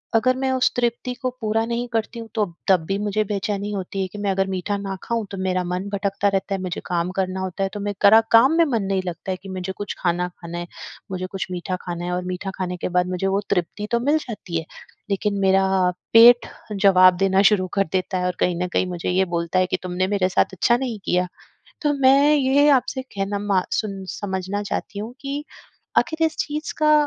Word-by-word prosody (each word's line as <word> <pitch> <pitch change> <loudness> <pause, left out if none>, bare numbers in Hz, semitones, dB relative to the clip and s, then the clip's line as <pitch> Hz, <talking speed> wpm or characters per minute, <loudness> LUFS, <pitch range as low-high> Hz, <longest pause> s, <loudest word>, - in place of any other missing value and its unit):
अगर 255 +3 +3
मैं 265 0 0
उस 255 -1 +2
तृप्ति 240 +1 -1
को 255 - 0
पूरा 220 +1 +1
नहीं 235 +1 -2
करती 225 +1 -2
हूँ, 225 - -7
तो 210 -2 +2 0.2
तब 190 -3 +5
भी 195 +2 -1
मुझे 210 +1 0
बेचैनी 205 0 -2
होती 195 0 -4
है 190 - -1
कि 205 - -11
मैं 200 -1 0
अगर 195 0 0
मीठा 190 +2 -2
ना 195 -1 -4
खाऊँ, 230 -2 -2
तो 195 - -5
मेरा 185 -1 0
मन 180 +3 -3
भटकता 200 0 0
रहता 195 0 -1
है, 190 - -5
मुझे 180 -2 -4
काम 175 0 -1
करना 190 0 -2
होता 190 +1 -3
है। 195 - 0
तो 205 - -5
मैं 205 0 -2
करा 215 +2 +8
काम 245 +7 +6
में 335 - +6
मन 230 -8 0
नहीं 190 -1 0
लगता 175 +2 -4
है 185 - -2
कि 195 - -9
मुझे 185 0 -4
कुछ 205 - -5
खाना 175 0 0
खाना 170 0 -6
है, 175 0 -5 0.4
मुझे 185 0 -3
कुछ 195 -1 -3
मीठा 180 +1 -3
खाना 175 0 -5
है 180 - -2
और 180 0 -2
मीठा 185 +2 -4
खाने 180 -1 -3
के - - -3
बाद 180 0 +1
मुझे 185 +1 -1
वो 195 +1 +1
तृप्ति 200 +3 -1
तो 235 - +2
मिल 290 +5 +2
जाती 205 - -5
है, 160 - -4 0.4
लेकिन 200 0 0
मेरा 190 0 +4 0.5
पेट 240 +1 +8 0.3
जवाब 185 -2 +6
देना 195 0 +3
शुरू 185 -3 +1
कर 195 -1 +2
देता 185 0 0
है 180 - -1
और 180 - -1
कहीं 180 -1 +2
न - - -1
कहीं - - +2
मुझे 175 -1 -3
ये 190 +1 +2
बोलता 170 +2 0
है 185 - +2
कि - - +3
तुमने 185 +1 -1
मेरे 195 -2 +1
साथ 190 - +1
अच्छा 235 +6 +3
नहीं 245 -5 -4
किया। 180 0 +1 0.6
तो 295 -1 +2
मैं 280 +3 +6
ये 285 +1 +4
आपसे 260 0 +1
कहना 200 +1 -2
मा 200 -2 +1
सुन 195 -3 -2
समझना 190 +1 -3
चाहती 200 0 -4
हूँ 225 +4 -6
कि 285 +1 -4 0.5
आखिर 325 -1 0
इस 315 - -4
चीज़ 300 +1 -3
का 305 0 +4
195 Hz, 230 wpm, -22 LUFS, 185-225 Hz, 0.6 s, करा